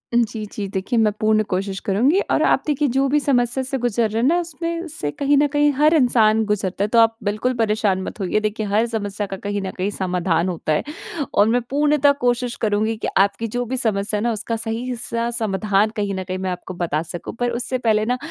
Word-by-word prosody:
जी, 225 -2 0
जी, 205 -2 -4
देखिए 195 +4 -2
मैं 215 -1 +3
पूर्ण 215 0 +3
कोशिश 195 +1 -2
करुँगी 250 - +3
और - - +3
आप - - +3
देखिए 295 0 +1
जो 270 +3 +1
भी 295 +2 +2
समस्या 260 -2 +1
से 270 +1 -3
गुज़र 235 -2 +1
रहे 220 +2 -1
हैं 250 - +3
ना 340 +4 +3
उसमें 335 +1 -4
से 220 - -4
कहीं 285 - +1
न 290 +1 +4
कहीं 290 +1 +2
हर 300 +4 +4
इंसान 225 -6 +4
गुज़रता 200 -2 -1
है। - - +1
तो 230 +2 +3
आप 225 0 +4
बिल्कुल 215 +5 0
परेशान 210 -4 +1
मत - - -7
होइए। 195 +2 0
देखिए 215 0 -2
हर 210 +3 +2
समस्या 205 -3 -3
का 195 - -5
कहीं 205 +1 -3
न 190 -1 -4
कहीं 190 +2 -1
समाधान 180 -3 0
होता 160 -3 -2
है 150 - 0 0.5
और 205 - +4
मैं 245 +2 +2
पूर्णतः 290 0 +3
कोशिश 245 0 0
करुँगी 220 +1 +1
कि - - -3
आपकी 200 +4 +2
जो 245 +3 -2
भी 260 +3 -3
समस्या 210 -3 0
है - - -2
ना, 235 - +1
उसका 230 +1 -3
सही-सा 230 +1 -3
समाधान 210 -2 +1
कहीं 205 -2 -1
न 190 - -3
कहीं 185 0 -4
मैं 185 0 -2
आपको 180 +1 -6
बता 170 -4 -1
सकूँ। 170 +1 -7
पर 245 0 +1
उससे 245 +2 -2
पहले 220 -3 +1
ना 250 +2 0
220 Hz, 225 wpm, -21 LUFS, 200-245 Hz, 0.5 s, न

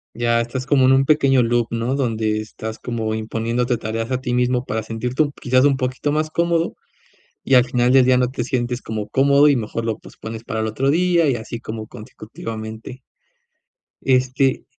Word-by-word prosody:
Ya, 120 0 +1
estás 125 +2 -5
como 135 -3 +4
en 130 - +5
un 135 +1 +4
pequeño 135 -3 +4
loop, 120 0 +1
¿no?, 115 +3 -1
donde 110 -5 0
estás 110 +1 -7
como 110 -3 -3
imponiéndote 115 +3 -1
tareas 115 +2 -4
a 130 0 -1
ti 125 -1 -2
mismo, 125 0 +1
para 110 -3 -3
sentirte 120 +6 -1
un, 145 - -3
quizás, 130 0 +3
un 140 -1 +4
poquito 130 +2 -2
más 155 +1 0
cómodo 170 +1 0 0.7
y, 135 - +3
al 125 -1 +6
final 125 0 +1
del 130 -1 +6
día, 130 0 +4
no 125 -1 +2
te 120 -2 -3
sientes 125 -1 -2
como 110 -1 -5
cómodo 140 +2 +4
y 140 - +3
mejor 115 0 -4
lo 115 -1 -2
pospones 110 0 -9
para 110 - -3
el 110 - -1
otro 130 +6 0
día, 170 0 +3
y 130 - +1
así 115 0 -6
como 110 -1 -7
consecutivamente. 110 +2 -8 1.0
Este, 130 +1 +1
125 Hz, 190 wpm, -20 LUFS, 115-135 Hz, 1.0 s, al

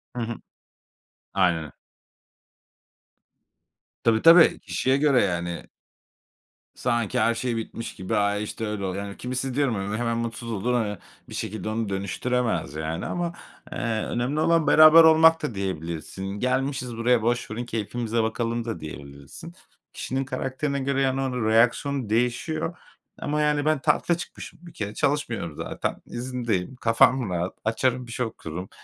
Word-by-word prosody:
Hı 120 - -2
hı. 115 0 -3 1.0
Aynen. 85 -5 +1 2.3
Tabii, 115 -1 +3
tabii, 165 0 +7
kişiye 130 +1 0
göre 140 -3 +4
yani. 85 -1 -3 1.1
Sanki 120 -4 0
her 115 0 +3
şey 120 -1 -2
bitmiş 115 +1 -6
gibi 95 - -3
"Ay, 105 0 +1
işte, 110 +1 -5
öyle 105 -2 -3
oluyor." 95 +2 -3
Yani 100 0 -8
kimisi 125 +1 -3
diyorum, 135 -4 +1
hani, 95 0 -3
böyle, 105 - -2
hemen 115 -1 0
mutsuz 115 0 -4
olur. 115 +4 -1
Hani, 105 -4 0 0.3
bir - - -9
şekilde 110 +1 -4
onu 110 -1 -2
dönüştüremez 100 - -1
yani 80 +2 -3
ama, 175 -1 -2 0.4
eee, - - -5 0.3
önemli 125 +5 -1
olan 165 0 +3
beraber 155 +1 +9
olmak 160 0 +6
da 120 -8 -3
diyebilirsin. 90 -1 -4
"Gelmişiz 130 -1 -1
buraya, 120 0 +3
boş 120 -1 -1
verin 120 +2 -4
keyfimize 115 0 -2
bakalım" 115 +1 -2
da 115 - -4
diyebilirsin. 70 - -10 0.4
Kişinin 135 +1 -3
karakterine 140 +1 -2
göre, 135 0 0
yani, 135 0 +1
onun 125 -4 -1
reaksiyonu 120 +2 +2
değişiyor 125 +9 -1 0.4
ama 150 +1 0
yani, 150 -1 +1
ben 155 -2 +2
tatile 160 +4 +2
çıkmışım 170 - -9
bir 170 -1 -13
kere, 105 0 -4
çalışmıyorum 120 - -1
zaten, - - -4
izindeyim. 120 -4 -3
Kafam 115 -1 +3
rahat; 90 +1 -2
açarım 125 +2 0
bir - - -9
şey 125 +1 -1
okurum, 90 -4 -7
120 Hz, 145 wpm, -25 LUFS, 105-135 Hz, 2.3 s, beraber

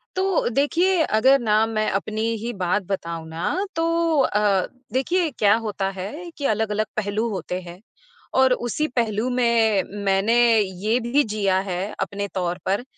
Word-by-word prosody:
तो 380 -1 +1
देखिए, 330 +8 +2
अगर 265 +5 +4
ना, 220 -1 +2
मैं 215 -1 -1
अपनी 215 +2 -2 0.2
ही 240 +1 -3
बात 185 +3 +1
बताऊँ 170 -4 -4
ना, 265 - -2
तो 330 -2 +1
अ, 205 -5 +2 0.3
देखिए, 335 +6 +1
क्या 210 -3 +3
होता 195 -2 -2
है 295 - -6
कि 285 - -4
अलग-अलग 215 0 -1
पहलू 215 +2 -1
होते 185 -2 -4
हैं 175 0 -11 0.6
और 260 -1 +5
उसी 305 +6 -1
पहलू 230 0 0
में 230 -5 +2 0.2
मैंने 195 +4 +2 0.2
ये 205 +4 0
भी 285 +4 +3
जिया 195 -3 +1
है 180 0 -2 0.2
अपने 200 +1 -3
तौर 180 -1 -1
पर, 200 +5 0
215 Hz, 155 wpm, -23 LUFS, 195-265 Hz, 0.6 s, और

